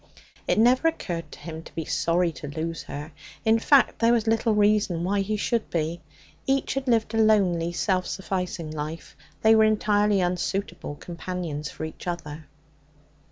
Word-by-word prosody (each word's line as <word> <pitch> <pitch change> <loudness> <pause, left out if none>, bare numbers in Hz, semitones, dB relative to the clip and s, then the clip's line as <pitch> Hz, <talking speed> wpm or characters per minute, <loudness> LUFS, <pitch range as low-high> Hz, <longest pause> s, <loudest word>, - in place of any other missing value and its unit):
It - - +2
never 250 +7 +4
occurred 175 - -3
to - - -10
him 160 -1 -7
to - - -15
be 160 - -3
sorry 170 +2 +1
to 150 - -8
lose 160 +3 -4
her; 150 +3 -7 0.3
in 225 +1 +4
fact, 275 +3 +4
there 230 0 +4
was 230 -2 +2
little 225 0 +2
reason 205 -4 +2
why 200 +3 +1
he 210 +2 -1
should 230 +2 -1
be. 165 +1 -2 0.5
Each 270 0 +1
had 270 0 -3
lived 225 -2 +2
a 225 - +1
lonely, 185 -6 +3
self 185 +1 0
sufficing 180 -4 -3
life; 155 +1 -6 0.3
they 220 - +7
were 220 0 +6
entirely 210 -1 +3
unsuitable 180 -2 -2
companions 170 -3 -5
for 155 - -6
each 160 - -9
other. 155 -3 -5
185 Hz, 165 wpm, -25 LUFS, 165-220 Hz, 0.5 s, they